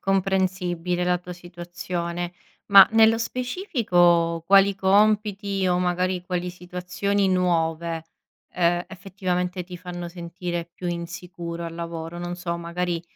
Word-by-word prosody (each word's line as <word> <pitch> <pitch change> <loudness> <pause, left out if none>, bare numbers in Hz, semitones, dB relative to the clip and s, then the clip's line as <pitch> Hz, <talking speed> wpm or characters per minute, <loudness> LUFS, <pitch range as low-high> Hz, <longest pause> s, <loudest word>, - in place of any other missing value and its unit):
comprensibile 185 -2 0
la 180 0 +2
tua 180 0 -9
situazione. 175 0 -5 0.4
Ma 195 -1 +10
nello 225 0 +5
specifico 200 - +1
quali 195 0 +6
compiti, 200 0 +2
o 180 0 +2
magari, 180 0 0
quali 180 -1 -2
situazioni 180 +3 -2
nuove, 165 -2 0 0.5
ehm, 175 0 +1
effettivamente, 185 -1 -3
ti 180 0 -9
fanno 175 -1 -7
sentire 175 0 -5
più 180 - -7
insicuro 170 0 -5
al 165 - -7
lavoro? 170 0 -6
Non 175 0 -4
so, 170 -1 -3
magari, 170 0 -3
180 Hz, 120 wpm, -24 LUFS, 175-190 Hz, 0.5 s, Ma